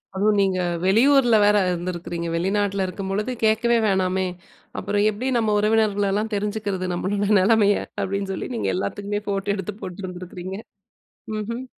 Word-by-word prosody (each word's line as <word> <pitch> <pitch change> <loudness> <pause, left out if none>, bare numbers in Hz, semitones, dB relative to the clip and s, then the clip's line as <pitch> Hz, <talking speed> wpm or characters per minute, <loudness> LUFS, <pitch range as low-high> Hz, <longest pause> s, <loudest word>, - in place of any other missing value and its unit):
அதுவும் 205 +1 +2
நீங்க 190 -2 +2 0.3
வெளியூர்ல 240 +4 +5
வேற 205 0 +5
இருந்திருக்குறீங்க. 175 -1 -3
வெளிநாட்டில 195 +2 0
இருக்கும்பொழுது 195 +5 -3
கேட்கவே 225 +2 +3
வேணாமே, 190 -1 +1 0.5
"அப்புறம் 205 +1 0
எப்படி 220 +5 -4
நம்ம 215 -2 +1
உறவினர்கலெல்லாம் 210 0 +1
தெரிஞ்சுக்கிறது, 205 -2 -2
நம்மளோட 200 +3 -1
நெலமைய?" 205 +1 +4 0.2
அப்படீன்னு 195 0 -2
சொல்லி, - - -4
நீங்க 105 -4 -1
எல்லாத்துக்குமே 205 - -3
ஃபோட்டோ 200 0 -1
எடுத்து 195 +1 -5
போட்டிருந்துருக்கறீங்க. 185 0 -7 0.8
ம்ஹ்ம். 230 +4 -4
200 Hz, 120 wpm, -23 LUFS, 185-210 Hz, 0.8 s, வெளியூர்ல